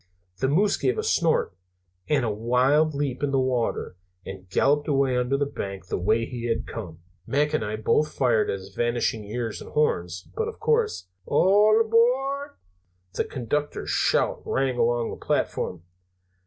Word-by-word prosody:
The 130 Hz, -, +1 dB
moose 195 Hz, +9 st, +2 dB
gave 130 Hz, -3 st, 0 dB
a -, -, -1 dB
snort, -, -, +1 dB, 0.6 s
and 140 Hz, -5 st, +2 dB
a 110 Hz, -, 0 dB
wild 130 Hz, +8 st, +2 dB
leap 140 Hz, -3 st, -2 dB
in 145 Hz, -, 0 dB
the 135 Hz, -1 st, +1 dB
water, 125 Hz, -7 st, -1 dB, 0.3 s
and 95 Hz, -1 st, -9 dB
galloped 145 Hz, +9 st, +2 dB
away 135 Hz, -3 st, +2 dB
under 125 Hz, +2 st, +1 dB
the 145 Hz, -, +1 dB
bank, 100 Hz, -9 st, -6 dB
the -, -, -1 dB
way 110 Hz, +5 st, +1 dB
he 120 Hz, -1 st, -6 dB
had 115 Hz, -, -1 dB
come. 85 Hz, -7 st, -8 dB, 0.3 s
Mac 150 Hz, +2 st, +1 dB
and 155 Hz, -, +1 dB
I 105 Hz, +1 st, -3 dB
both 150 Hz, +8 st, +1 dB
fired 120 Hz, -5 st, +1 dB
at -, -, -1 dB
his 95 Hz, 0 st, -12 dB
vanishing 120 Hz, -1 st, 0 dB
ears 115 Hz, +1 st, -4 dB
and -, -, -10 dB
horns, 90 Hz, -, 0 dB
but 450 Hz, -, -1 dB
of 450 Hz, -, -7 dB
course 455 Hz, -1 st, +1 dB
" 95 Hz, -, -44 dB
"All 205 Hz, +7 st, +4 dB
Aboooard!" 260 Hz, +6 st, +1 dB, 0.6 s
The -, -, -1 dB
conductor's 145 Hz, +3 st, -3 dB
shout -, -, +1 dB
rang 135 Hz, -1 st, 0 dB
along 120 Hz, 0 st, +1 dB
the -, -, -9 dB
platform. 90 Hz, -2 st, -1 dB
130 Hz, 170 wpm, -25 LUFS, 110-150 Hz, 0.6 s, All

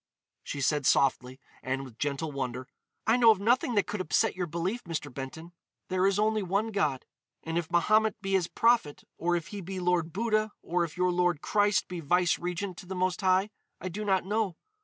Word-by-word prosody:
She 140 Hz, -, -5 dB
said 145 Hz, 0 st, +1 dB
softly, 130 Hz, -1 st, +2 dB, 0.2 s
and 135 Hz, +1 st, -3 dB
with 115 Hz, -3 st, -14 dB
gentle 145 Hz, +2 st, -2 dB
wonder: 130 Hz, -2 st, -4 dB, 0.4 s
"I 225 Hz, +2 st, +4 dB
know 235 Hz, -2 st, +6 dB
of 215 Hz, -4 st, +5 dB
nothing 240 Hz, +3 st, +2 dB
that 205 Hz, -, +3 dB
could 210 Hz, -, -3 dB
upset 200 Hz, +6 st, +1 dB
your 180 Hz, -1 st, -2 dB
belief, 175 Hz, +8 st, -3 dB
Mr. 155 Hz, -5 st, -4 dB
Benton. 160 Hz, +6 st, -7 dB, 0.4 s
There 185 Hz, +1 st, +2 dB
is 195 Hz, 0 st, +1 dB
only 215 Hz, +1 st, +2 dB
one 200 Hz, +4 st, -1 dB
God. 150 Hz, -10 st, 0 dB, 0.4 s
And 165 Hz, 0 st, -4 dB
if 170 Hz, -1 st, -1 dB
Mahomet 215 Hz, +5 st, +3 dB
be 195 Hz, -1 st, -4 dB
His 190 Hz, -3 st, +2 dB
prophet, 230 Hz, -11 st, +2 dB, 0.2 s
or 175 Hz, +1 st, +1 dB
if 170 Hz, -3 st, -3 dB
he 205 Hz, -1 st, -6 dB
be 190 Hz, +1 st, -5 dB
Lord 175 Hz, -2 st, +1 dB
Buddha, 215 Hz, +1 st, 0 dB
or 175 Hz, +1 st, 0 dB
if 165 Hz, 0 st, -6 dB
your 180 Hz, 0 st, +2 dB
Lord 175 Hz, -3 st, +1 dB
Christ 205 Hz, -1 st, +2 dB
be 180 Hz, -1 st, -5 dB
vice 175 Hz, +3 st, +2 dB
regent 180 Hz, +1 st, -4 dB
to 185 Hz, -, -10 dB
the 190 Hz, -, -5 dB
Most 185 Hz, +2 st, 0 dB
High, 190 Hz, +2 st, +2 dB, 0.3 s
I 185 Hz, -, -4 dB
do 205 Hz, +5 st, -5 dB
not 190 Hz, -3 st, +1 dB
know. 205 Hz, -3 st, -1 dB
180 Hz, 205 wpm, -29 LUFS, 160-205 Hz, 0.4 s, know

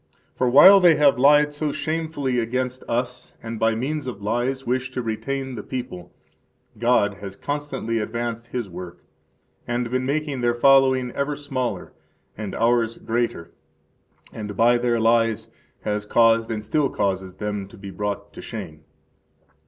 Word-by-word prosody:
For 125 Hz, -, +1 dB
while 185 Hz, +10 st, +9 dB
they 175 Hz, -3 st, +6 dB
have 140 Hz, -3 st, +4 dB
lied 150 Hz, +2 st, +5 dB
so 150 Hz, 0 st, -2 dB
shamefully 155 Hz, -5 st, -2 dB
against 125 Hz, +2 st, -2 dB
us 125 Hz, +1 st, -3 dB
and 115 Hz, -1 st, -5 dB
by 115 Hz, 0 st, +2 dB
means 140 Hz, +4 st, -3 dB
of 105 Hz, -5 st, -6 dB
lies 120 Hz, +5 st, -1 dB
wished 130 Hz, +1 st, -2 dB
to 125 Hz, -, -1 dB
retain 130 Hz, +4 st, -3 dB
the 110 Hz, -, -5 dB
people, 105 Hz, -9 st, -6 dB, 0.7 s
God 110 Hz, -4 st, +2 dB
has 100 Hz, -1 st, -7 dB
constantly 145 Hz, -4 st, -3 dB
advanced 115 Hz, +1 st, -4 dB
His 120 Hz, -3 st, -4 dB
work, 90 Hz, -1 st, -9 dB, 0.6 s
and 120 Hz, 0 st, -2 dB
been 130 Hz, 0 st, 0 dB
making 140 Hz, -1 st, -2 dB
their 120 Hz, 0 st, +1 dB
following 130 Hz, 0 st, +4 dB
ever 140 Hz, +3 st, -2 dB
smaller 135 Hz, -4 st, -4 dB, 0.4 s
and 105 Hz, -2 st, -6 dB
ours 115 Hz, 0 st, +1 dB
greater, 115 Hz, -7 st, -2 dB, 0.8 s
and 105 Hz, -2 st, -6 dB
by 120 Hz, +1 st, +4 dB
their 120 Hz, -1 st, +1 dB
lies 115 Hz, -1 st, +2 dB, 0.3 s
has 105 Hz, 0 st, -2 dB
caused 115 Hz, 0 st, +4 dB
and 110 Hz, -2 st, -4 dB
still 140 Hz, +5 st, +1 dB
causes 95 Hz, -2 st, -2 dB
them 105 Hz, -2 st, -4 dB
to -, -, -15 dB
be 100 Hz, -1 st, -9 dB
brought 100 Hz, +1 st, -4 dB
to -, -, -9 dB
shame. 80 Hz, -9 st, -8 dB
120 Hz, 155 wpm, -23 LUFS, 110-135 Hz, 0.8 s, while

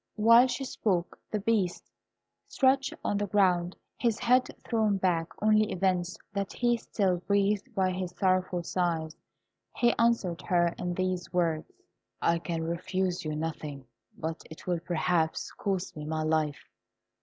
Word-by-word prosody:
While 230 Hz, +3 st, +7 dB
she 255 Hz, +2 st, -3 dB
spoke 185 Hz, -9 st, -1 dB
the 215 Hz, -, -1 dB
Beast 200 Hz, -4 st, 0 dB, 0.6 s
stretched 270 Hz, 0 st, +2 dB
on 205 Hz, -, 0 dB
the 205 Hz, -, -1 dB
ground, 180 Hz, -3 st, +2 dB, 0.2 s
his 230 Hz, -3 st, +1 dB
head 250 Hz, +1 st, +3 dB, 0.2 s
thrown 220 Hz, -4 st, +2 dB
back, 175 Hz, -3 st, +1 dB, 0.2 s
only 215 Hz, 0 st, +4 dB
evinced 180 Hz, -1 st, 0 dB, 0.2 s
that 200 Hz, -1 st, -2 dB
he 240 Hz, 0 st, +2 dB
still 195 Hz, -5 st, 0 dB
breathed 200 Hz, +5 st, 0 dB
by 190 Hz, -2 st, +2 dB
his 185 Hz, 0 st, -3 dB
sorrowful 185 Hz, -2 st, +1 dB
sighs. 165 Hz, -3 st, -1 dB, 0.6 s
He 240 Hz, -1 st, +4 dB
answered 220 Hz, -7 st, +2 dB
her 175 Hz, -2 st, +2 dB
in 175 Hz, 0 st, -2 dB
these 185 Hz, -1 st, -2 dB
words: 165 Hz, -3 st, 0 dB, 0.5 s
"I 170 Hz, 0 st, +2 dB
can 165 Hz, -1 st, -3 dB
refuse 180 Hz, +2 st, -2 dB
you 155 Hz, -1 st, -3 dB
nothing; 150 Hz, -3 st, -5 dB, 0.3 s
but 160 Hz, +1 st, -4 dB
it 160 Hz, -, -11 dB
will 175 Hz, -2 st, 0 dB
perhaps 170 Hz, -1 st, 0 dB
cost 190 Hz, -3 st, -3 dB
me 150 Hz, -, -6 dB
my 155 Hz, 0 st, -2 dB
life. 155 Hz, -9 st, 0 dB
185 Hz, 145 wpm, -29 LUFS, 170-210 Hz, 0.6 s, While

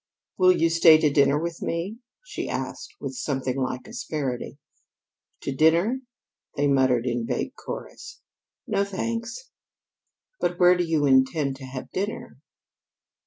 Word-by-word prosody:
"Will 185 Hz, 0 st, +7 dB
you 165 Hz, -2 st, +2 dB
stay 165 Hz, -1 st, +7 dB
to 155 Hz, -2 st, +2 dB
dinner 140 Hz, 0 st, +4 dB
with 170 Hz, +1 st, -4 dB
me?" 180 Hz, +7 st, -3 dB, 0.3 s
she -, -, -5 dB
asked -, -, -5 dB
with -, -, -5 dB
something 135 Hz, -, -2 dB
like 130 Hz, 0 st, -3 dB
asperity. 150 Hz, -, -4 dB, 0.8 s
"To -, -, -3 dB
dinner?" 170 Hz, -, +3 dB, 0.6 s
they 145 Hz, -, +2 dB
murmured 130 Hz, -4 st, +3 dB
in 120 Hz, -2 st, -1 dB
vague -, -, -2 dB
chorus. -, -, -8 dB, 0.5 s
"No, 200 Hz, -, +1 dB
thanks." 230 Hz, -, -4 dB, 0.9 s
"But 175 Hz, 0 st, -1 dB
where 180 Hz, 0 st, +6 dB
do 180 Hz, -, 0 dB
you 160 Hz, -3 st, +1 dB
intend 135 Hz, +1 st, +2 dB
to 135 Hz, -, -9 dB
have 130 Hz, 0 st, -8 dB
dinner?" 200 Hz, +3 st, -4 dB
160 Hz, 135 wpm, -25 LUFS, 135-185 Hz, 0.9 s, Will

